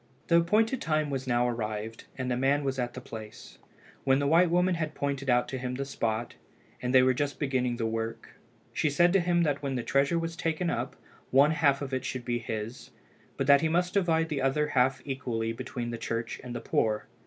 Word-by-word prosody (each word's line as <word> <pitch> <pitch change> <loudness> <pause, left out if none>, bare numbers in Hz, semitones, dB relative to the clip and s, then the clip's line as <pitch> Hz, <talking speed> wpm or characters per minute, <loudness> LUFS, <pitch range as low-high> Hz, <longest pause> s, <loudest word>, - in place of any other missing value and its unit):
The 170 - +6
appointed 220 +9 +2
time 155 -2 0
was 135 -1 -3
now 120 -1 +2
arrived, 110 -1 -4
and 130 -1 -2
the - - +1
man 135 +3 +2
was 135 -1 -2
at 120 0 -2
the - - -5
place. 110 -3 -10 0.4
When 135 -1 +4
the 140 - 0
white 165 +4 +5
woman 180 +2 +3
had 155 -3 -3
pointed 140 -1 -2
out 125 0 +3
to 130 - -4
him 125 0 -3
the 140 +2 -3
spot, 115 -4 -2 0.5
and 125 - -1
they 130 -1 +6
were 130 0 +4
just 140 +3 -2
beginning 130 -4 0
the 115 - -1
work, 115 0 -3 0.4
she 155 - +1
said 175 +5 +4
to 195 - +5
him 175 -1 +2
that 145 -3 0
when 135 -2 -2
the 125 - -2
treasure 140 +6 +2
was 165 0 -3
taken 165 +1 -1
up 120 +3 -3 0.3
one 140 +3 +5
half 145 -3 +2
of 135 -1 -6
it 130 -1 -1
should 130 -2 -4
be 120 -1 -1
his, 110 +1 -5 0.5
but 135 - 0
that 140 0 +6
he 160 - +2
must 180 +2 +1
divide 165 -4 +2
the 145 -3 -2
other 150 +3 +1
half 130 -1 +2
equally 120 -5 -2
between 120 -1 -5
the 115 - -5
church 115 0 -3
and 120 -1 -6
the 120 - -4
poor. 110 -1 0
135 Hz, 220 wpm, -29 LUFS, 120-155 Hz, 0.5 s, The